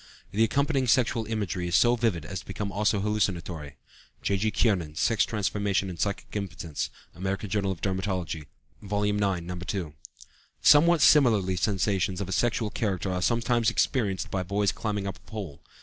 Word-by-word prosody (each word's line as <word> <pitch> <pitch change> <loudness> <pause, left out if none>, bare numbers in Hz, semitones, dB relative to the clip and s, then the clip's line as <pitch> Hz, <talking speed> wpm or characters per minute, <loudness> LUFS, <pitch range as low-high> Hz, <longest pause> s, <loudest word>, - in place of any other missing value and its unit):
The 110 +3 +2
accompanying 140 +3 +1
sexual 115 -2 +2
imagery 100 -5 -2
is 85 - 0
so 120 +3 +5
vivid 110 -10 0
as - - -9
almost 95 -2 -4
to - - -21
become 100 +1 -4 0.3
hallucinatory. 85 -8 -2 0.5
(J.G. 100 +2 +1
Kiernan, 90 -10 0
"Sex 115 +7 +2
Transformation 100 -2 -1
and 85 - -9
Psychic 100 +2 -3
Impotence," 85 -6 -4 0.2
American 95 +2 -3
Journal 100 -2 +1
of 85 -5 -6
Dermatology, 95 -5 -2 0.3
vol. 105 0 -2
ix, 105 0 +1
No. 90 -3 -1
2.) 90 -4 -4 0.7
Somewhat 165 +3 +6
similarly 110 -11 +5
sensations 95 -1 0
of 95 -1 -3
sexual 115 0 0
character 100 -4 -1
are 90 - -2
sometimes 115 +2 +2
experienced 110 -5 0
by 95 - -1
boys 100 +2 +1
when - - -17
climbing 105 -3 -1
up 100 -2 -4
a - - -23
pole. 100 -10 -7
100 Hz, 165 wpm, -27 LUFS, 90-110 Hz, 0.7 s, Somewhat